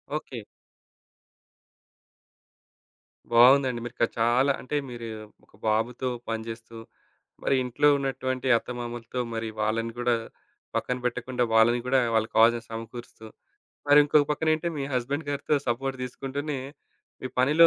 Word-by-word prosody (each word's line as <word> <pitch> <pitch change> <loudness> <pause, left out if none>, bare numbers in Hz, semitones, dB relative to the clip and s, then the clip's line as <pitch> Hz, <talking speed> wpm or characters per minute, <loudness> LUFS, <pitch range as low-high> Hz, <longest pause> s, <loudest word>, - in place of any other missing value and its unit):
Okay. 135 -5 -5 2.9
బావుందండి. 125 +1 +6
మీరిక 120 0 -3 0.2
చాలా 120 +4 +3
అంటే, 140 - -4
మీరు 120 -1 -7 0.4
ఒక - - -32
బాబుతో 115 +4 0 0.2
పనిజేస్తూ, 115 0 -5 0.7
మరి 135 - +2
ఇంట్లో 125 +4 +2
ఉన్నటువంటి 130 -1 -2
అత్తమామలతో 120 0 -6
మరి 115 0 -3
వాళ్ళని 115 +2 0
గూడా 120 -1 +2 0.6
పక్కన 125 - -1
బెట్టకుండా 125 +1 -1
వాళ్ళని 115 +2 +5
గూడా 130 +1 +4 0.2
వాళ్ళకి 110 0 0
కావాల్సినయి 115 +1 +4
సమకూరుస్తూ, 115 0 -8 0.6
మరి 145 +1 +8
ఇంకొక 145 0 +4
పక్కనేంటే 155 +2 +1
మీ - - -2
హస్బెండ్ 140 +5 -2
గారితో 145 +1 0
సపోర్ట్ 130 +3 -1
దీసుకుంటూనే 135 +3 -4 0.6
మీ 130 - -3
పనిలో 150 +6 +6
125 Hz, 110 wpm, -27 LUFS, 115-135 Hz, 2.9 s, మరి